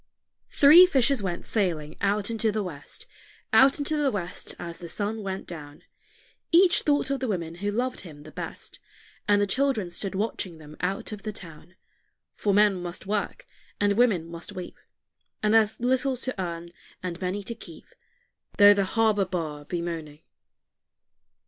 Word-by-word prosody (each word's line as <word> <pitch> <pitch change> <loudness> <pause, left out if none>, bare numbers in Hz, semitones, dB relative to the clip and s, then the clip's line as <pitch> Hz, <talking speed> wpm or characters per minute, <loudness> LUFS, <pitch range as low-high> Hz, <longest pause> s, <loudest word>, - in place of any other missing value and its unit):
Three 320 +6 +8
fishers 270 - +2
went 180 -3 -3
sailing 165 -8 -1
out 205 +2 +1
into 225 -1 +1
the 210 0 -1
west, 145 -6 -8 0.5
Out 270 +1 +6
into 295 +1 0
the 295 -2 +2
west 180 -6 -5
as 170 -1 -7
the 170 - -8
sun 215 +4 -2
went 190 -1 -4
down; 150 -4 -10 0.7
Each 355 +1 +6
thought 290 -2 +1
of 275 - 0
the 260 - -2
woman 170 -6 -2
who 205 - 0
loved 245 +5 -1
him 150 -5 -10
the - - -12
best, - - -7 0.5
And 205 0 +4
the 205 - +3
children 220 -4 0
stood 195 +3 -2
watching 190 -4 -2
them 150 -1 -12
out 190 +5 -2
of 210 -1 -7
the 215 - -4
town; 175 -2 -10 0.6
For 205 - 0
men 200 -2 +4
must 175 +1 -6
work, 210 - -2 0.3
and 205 0 +3
women 210 -7 +3
must 170 +4 -8
weep; 185 -2 -8 0.6
And 210 0 +3
there's 220 -1 +3
little 255 +2 +1
to 255 -5 -3
earn, 170 -1 -5 0.3
and 180 -1 -5
many 190 +2 -2
to 235 - -2
keep, 175 -8 -12 0.7
Though 205 0 +9
the 200 -1 +1
harbor 215 -1 +2
bar 160 -5 -4
be 170 +2 -3
moaning. 160 -3 -6
200 Hz, 170 wpm, -26 LUFS, 175-225 Hz, 0.7 s, Though